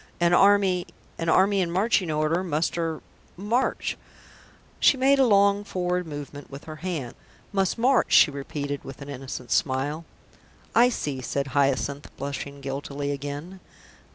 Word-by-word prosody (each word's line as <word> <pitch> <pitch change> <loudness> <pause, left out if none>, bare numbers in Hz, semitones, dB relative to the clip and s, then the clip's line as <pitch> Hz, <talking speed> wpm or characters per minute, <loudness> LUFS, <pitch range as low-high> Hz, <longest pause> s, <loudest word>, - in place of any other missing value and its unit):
An 175 0 +3
army 195 -1 +4 0.3
an 165 0 -1
army 195 +3 +4
in 175 - 0
marching 190 0 +1
order 155 +3 +1
must 160 -2 -1
er 165 -2 -2 0.4
march." 225 +7 -1 0.8
She 275 - +5
made 275 +2 +4
a 265 - +5
long 200 -1 +4
forward 180 -2 -2
movement 145 -1 -8
with 140 +1 -9
her 155 -1 -8
hand. 155 -7 -4 0.4
"Must 195 +1 +1
march," 255 +2 +3
she 150 - +7
repeated, 140 0 -5
with 135 +1 -9
an 140 - -10
innocent 130 -2 -7
smile. 145 +4 0 0.7
"I 240 +1 +6
see," 145 - -3
said 140 +2 -2
Hyacinth, 140 0 0
blushing 140 0 -5
guiltily 140 +1 -4
again. 145 +6 -6
160 Hz, 145 wpm, -25 LUFS, 140-190 Hz, 0.8 s, she